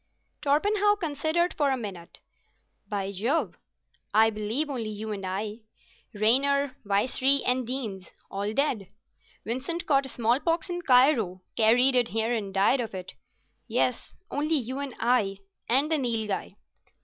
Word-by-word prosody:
Torpenhow 410 Hz, +8 st, +3 dB
considered 320 Hz, +1 st, 0 dB
for 290 Hz, -2 st, +1 dB
a 265 Hz, -, +1 dB
minute. 190 Hz, -7 st, -8 dB, 0.7 s
"By 200 Hz, -2 st, -2 dB
Jove! 235 Hz, -, -1 dB, 0.6 s
I 220 Hz, +1 st, +6 dB
believe 215 Hz, +8 st, -2 dB
only 245 Hz, -6 st, -4 dB
you 215 Hz, +1 st, -5 dB
and 200 Hz, -2 st, -5 dB
I. 205 Hz, +4 st, -4 dB, 0.6 s
Raynor, 270 Hz, +5 st, +3 dB
Vicery, 255 Hz, +7 st, +2 dB
and 250 Hz, -1 st, +1 dB
Deenes—all 205 Hz, -4 st, -5 dB
dead; 240 Hz, -10 st, 0 dB, 0.6 s
Vincent 265 Hz, +9 st, -2 dB
caught 275 Hz, -2 st, +2 dB
smallpox 290 Hz, -, 0 dB
in 350 Hz, 0 st, -3 dB
Cairo, 250 Hz, -, +3 dB
carried 245 Hz, +4 st, +5 dB
it 245 Hz, -2 st, +3 dB
here 225 Hz, +2 st, 0 dB
and 205 Hz, -4 st, -3 dB
died 200 Hz, +7 st, +3 dB
of 220 Hz, -4 st, -5 dB
it. 185 Hz, 0 st, -7 dB, 0.5 s
Yes, -, -, -1 dB, 0.2 s
only 305 Hz, +3 st, 0 dB
you 260 Hz, -1 st, -2 dB
and 280 Hz, -2 st, -5 dB
I 225 Hz, -5 st, +1 dB, 0.3 s
and 275 Hz, +6 st, +3 dB
the 315 Hz, -, +2 dB
Nilghai." 220 Hz, -6 st, -2 dB
245 Hz, 135 wpm, -27 LUFS, 210-280 Hz, 0.7 s, I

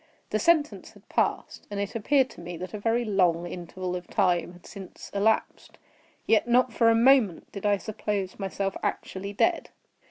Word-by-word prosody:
The 215 Hz, -, +1 dB
sentence 310 Hz, +3 st, +1 dB
had -, -, -20 dB
passed; -, -, -1 dB
and 205 Hz, -1 st, -4 dB
it 200 Hz, 0 st, -3 dB
appeared 260 Hz, +3 st, +2 dB
to -, -, -12 dB
me 175 Hz, 0 st, -7 dB
that 185 Hz, +4 st, -7 dB
a 210 Hz, -, -4 dB
very 230 Hz, +3 st, 0 dB
long 180 Hz, -5 st, +2 dB
interval 180 Hz, +1 st, -5 dB
of 180 Hz, -1 st, -6 dB
time 175 Hz, -1 st, +1 dB
had 175 Hz, -1 st, -17 dB
since 195 Hz, -3 st, -11 dB
elapsed. 205 Hz, +2 st, 0 dB, 0.5 s
Yet 225 Hz, +1 st, +3 dB
not 245 Hz, 0 st, +3 dB
for 230 Hz, -1 st, +4 dB
a 225 Hz, -, +4 dB
moment 230 Hz, -6 st, +3 dB
did 200 Hz, 0 st, -3 dB
I 205 Hz, -1 st, +3 dB
suppose 205 Hz, -2 st, -4 dB
myself 195 Hz, 0 st, -3 dB
actually 200 Hz, +2 st, -4 dB
dead. 340 Hz, -, +1 dB
200 Hz, 180 wpm, -27 LUFS, 185-230 Hz, 0.5 s, for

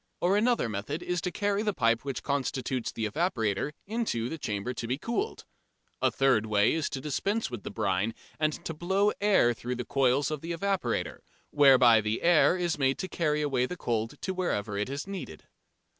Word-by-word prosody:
Or 185 Hz, +3 st, +2 dB
another 230 Hz, -, +2 dB
method 110 Hz, -, -4 dB
is 180 Hz, -1 st, -1 dB
to 180 Hz, -, -2 dB
carry 205 Hz, +1 st, 0 dB
the 210 Hz, -3 st, -1 dB
pipe 115 Hz, 0 st, +2 dB
which 135 Hz, -2 st, -4 dB
constitutes 130 Hz, -3 st, -2 dB
the 110 Hz, -1 st, -2 dB
evaporator 115 Hz, -, -1 dB
into 205 Hz, -, -2 dB
the 160 Hz, -, -5 dB
chamber 105 Hz, +1 st, -3 dB
to 120 Hz, -, -5 dB
be 125 Hz, +3 st, -1 dB
cooled. 235 Hz, -, -3 dB, 0.6 s
A -, -, +4 dB
third 130 Hz, -5 st, +2 dB
way 105 Hz, 0 st, +3 dB
is 160 Hz, -2 st, -1 dB
to 135 Hz, -, -5 dB
dispense 195 Hz, -, -1 dB
with 120 Hz, -4 st, -5 dB
brine 100 Hz, +3 st, -1 dB, 0.2 s
and 155 Hz, -1 st, -1 dB
to 165 Hz, -, -3 dB
blow 190 Hz, +6 st, +1 dB
air 195 Hz, -13 st, +4 dB
through 125 Hz, +2 st, -4 dB
the 125 Hz, -, -4 dB
coils 135 Hz, +2 st, +2 dB
of 150 Hz, -2 st, -3 dB
the 170 Hz, +1 st, -4 dB
evaporator, 195 Hz, +2 st, -1 dB, 0.3 s
whereby 130 Hz, -6 st, +6 dB
the 110 Hz, +1 st, -2 dB
air 175 Hz, +1 st, +5 dB
is 175 Hz, -4 st, -1 dB
made 135 Hz, -1 st, +2 dB
to 185 Hz, -, -4 dB
carry 150 Hz, -4 st, 0 dB
away 130 Hz, -4 st, +1 dB
the 180 Hz, -, -6 dB
cold 115 Hz, -5 st, -2 dB
to 190 Hz, -, -1 dB
wherever 110 Hz, -, -2 dB
it 105 Hz, +4 st, -2 dB
is 140 Hz, +1 st, -4 dB
needed. 190 Hz, -, -7 dB
140 Hz, 190 wpm, -29 LUFS, 115-180 Hz, 0.6 s, whereby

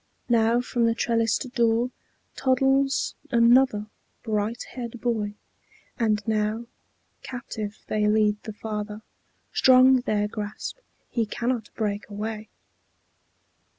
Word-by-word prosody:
Now 230 Hz, 0 st, +4 dB
from 240 Hz, -1 st, +1 dB
the 230 Hz, -, +1 dB
trellised 230 Hz, +2 st, 0 dB
door 235 Hz, 0 st, +2 dB, 0.4 s
Toddles 270 Hz, +1 st, +2 dB, 0.2 s
another 235 Hz, -2 st, +4 dB, 0.4 s
bright 220 Hz, +1 st, -1 dB
haired 240 Hz, -2 st, -6 dB
boy. 215 Hz, -4 st, -1 dB, 0.6 s
And 215 Hz, -2 st, +1 dB
now 215 Hz, +1 st, 0 dB, 0.6 s
Captive 220 Hz, -4 st, -6 dB
they 210 Hz, -1 st, +1 dB
lead 210 Hz, -1 st, +2 dB
the 215 Hz, -, -7 dB
father; 210 Hz, 0 st, -5 dB, 0.5 s
strong 260 Hz, 0 st, +6 dB
their 210 Hz, -4 st, 0 dB
grasp; 210 Hz, -, -6 dB, 0.3 s
He 230 Hz, -3 st, 0 dB
cannot 235 Hz, 0 st, -2 dB
break 210 Hz, -2 st, -2 dB
away. 215 Hz, +1 st, -5 dB
225 Hz, 105 wpm, -25 LUFS, 210-240 Hz, 0.6 s, strong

